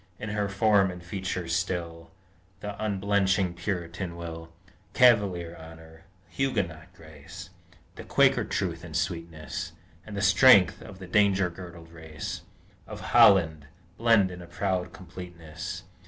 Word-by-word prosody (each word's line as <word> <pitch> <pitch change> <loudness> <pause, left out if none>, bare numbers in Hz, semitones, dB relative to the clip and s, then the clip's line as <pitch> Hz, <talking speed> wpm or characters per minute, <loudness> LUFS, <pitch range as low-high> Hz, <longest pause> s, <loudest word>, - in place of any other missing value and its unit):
In 110 - -6
her 105 -1 -1
form 100 -1 +3
and 90 -1 -8
features 90 -2 -3
still 85 -2 -3 0.5
The 105 0 -5
unblenching 95 -2 +1
Puritan 85 -1 -4
will, 85 -1 -8 0.4
Cavalier 100 -9 +3
honor, 80 0 -14 0.2
Huguenot 90 - -2
grace, 80 +3 -12 0.5
The - - -7
Quaker - - +3
truth 85 -3 -3
and 80 -3 -9
sweetness, 85 -5 -4 0.3
And 105 -2 -8
the 100 - -1
strength 100 -1 +6
of 95 - -11
the 95 - -9
danger 95 -1 +2
girdled 85 -2 -11
race 80 -2 -7 0.5
Of - - -8
Holland, 80 -7 +5 0.3
blend 115 -5 +4
in 90 0 -9
a 85 - -11
proud 90 0 -2
completeness. 90 -1 -8
90 Hz, 125 wpm, -27 LUFS, 85-100 Hz, 0.5 s, strength